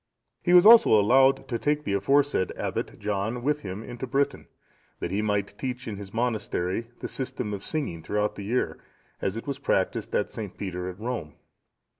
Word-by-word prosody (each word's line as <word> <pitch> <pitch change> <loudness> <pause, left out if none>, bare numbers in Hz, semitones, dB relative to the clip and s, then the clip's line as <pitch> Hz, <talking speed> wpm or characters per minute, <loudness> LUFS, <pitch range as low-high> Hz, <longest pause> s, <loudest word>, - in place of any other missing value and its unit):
He 175 0 +4
was 180 - +8
also 225 - +8
allowed 135 +5 +4
to 120 -2 -2
take 150 0 0
the 100 - -2
aforesaid 135 +1 +2
Abbot - - -3
John 105 +4 -2
with 150 +2 +1
him 100 -5 -6
into 120 +2 -6
Britain, 140 +3 0 0.5
that 85 - -3
he 100 +2 0
might 100 -2 -1
teach 125 -2 -4
in 105 -3 -4
his 100 -1 -9
monastery 115 -3 -1
the - - -3
system 125 -5 -4
of 100 0 -5
singing 140 - -3
throughout 105 +4 -1
the 100 - -7
year, 120 +5 -1 0.4
as 95 +3 -1
it 115 - -6
was 140 -1 -4
practised 95 -8 0
at - - 0
St. 105 -4 -7
Peter's 90 -2 -4
at - - -22
Rome. 110 -11 -4
115 Hz, 185 wpm, -26 LUFS, 100-135 Hz, 0.5 s, was